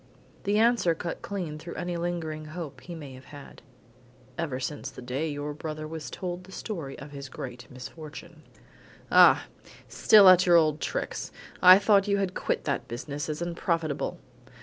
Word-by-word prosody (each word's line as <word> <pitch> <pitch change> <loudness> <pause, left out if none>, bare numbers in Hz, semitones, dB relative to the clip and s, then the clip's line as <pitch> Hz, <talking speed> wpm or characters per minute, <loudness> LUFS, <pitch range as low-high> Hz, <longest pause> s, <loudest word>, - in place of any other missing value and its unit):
The 205 +1 +2
answer 225 -7 +3
cut 170 +1 -5
clean 175 -7 -5
through 170 +2 -8
any 175 0 -3
lingering 170 -3 -3
hope 155 -1 -7
he 175 - -8
may 145 -5 -9
have 130 +1 -13
had. 145 -1 -12 0.7
"Ever 150 -6 -3
since 140 +1 -4
the - - -12
day 135 +6 -2
your 145 0 -4
brother 155 0 -6
was 160 -1 -6
told 180 -1 -5
the 190 - -14
story 165 -11 -6
of 140 +2 -10
his 140 -1 -8
great 125 -4 -8
misfortune." 155 +5 -10 0.7
"Ah! - - +7 0.4
still 210 -3 +6
at 185 0 +7
your 175 - +6
old 155 -2 +3
tricks! - - -3 0.3
I 185 +1 +10
thought 200 0 +3
you 200 0 +2
had 195 -2 -1
quit - - -2
that - - -2
business 145 +5 -5
as 155 +2 -3
unprofitable." 170 -3 -2
160 Hz, 170 wpm, -27 LUFS, 145-180 Hz, 0.7 s, I